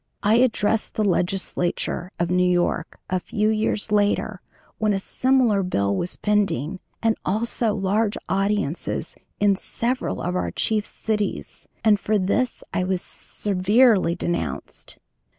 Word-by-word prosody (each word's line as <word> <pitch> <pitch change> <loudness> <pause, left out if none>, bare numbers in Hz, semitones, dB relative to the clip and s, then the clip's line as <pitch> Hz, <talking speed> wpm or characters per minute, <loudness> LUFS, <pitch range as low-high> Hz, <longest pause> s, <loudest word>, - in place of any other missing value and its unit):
I 215 +2 +4
addressed 225 -3 +1
the 215 - +1
Legislature 180 -2 -1
of 170 0 0
New 180 0 +3
York 175 -2 0
a 185 - 0
few 210 +4 0
years 215 -1 0
later 205 -1 +1 0.4
when 215 -1 +2
a - - +1
similar 245 0 +2
bill 100 - 0
was 175 - -3
pending, 195 - 0 0.2
and 225 -1 +3
also 220 +2 0
large 205 +2 +1
audiences 195 -4 -1 0.2
in 205 -1 +4
several 240 +6 -2
of 180 +1 -2
our 180 - 0
chief 215 -1 0
cities, 210 -2 -3 0.2
and 215 -2 +5
for 215 +1 +1
this 205 +6 0
I 180 - +1
was 185 0 -1
severely 205 -1 +2
denounced. 125 - -4
205 Hz, 135 wpm, -23 LUFS, 180-215 Hz, 0.4 s, and